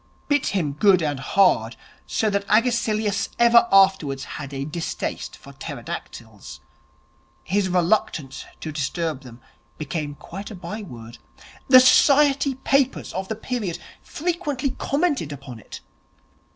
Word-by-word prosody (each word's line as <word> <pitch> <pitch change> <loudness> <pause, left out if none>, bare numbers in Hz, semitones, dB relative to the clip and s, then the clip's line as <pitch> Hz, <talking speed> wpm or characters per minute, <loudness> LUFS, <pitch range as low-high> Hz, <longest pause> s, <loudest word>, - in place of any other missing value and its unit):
Bit 290 -2 +1
him 165 -8 -1
good 185 +3 +4
and 145 -3 -2
hard, 130 - +2 0.3
so 215 -1 0
that 200 0 -1
Agesilaus 220 -2 +1
ever 235 0 +6
afterwards 190 -9 +4
had 145 -2 -7
a 135 0 -4
distaste 160 +2 -5
for - - -14
pterodactyls. 105 - -8 0.8
His 195 0 0
reluctance 170 -6 0 0.2
to 155 - -5
disturb 150 0 -3
them 125 -3 -13 0.4
became 150 -1 -4
quite 195 +7 -9
a 215 - -8
byword. 170 - -9 0.5
The 255 -1 +9
Society 275 +1 +4
papers 270 0 0
of 190 +1 -4
the 220 - -3
period 215 -6 -4 0.2
frequently 300 -5 -2
commented 280 - -1
upon 135 -4 -9
it. - - -11
190 Hz, 125 wpm, -23 LUFS, 145-235 Hz, 0.8 s, The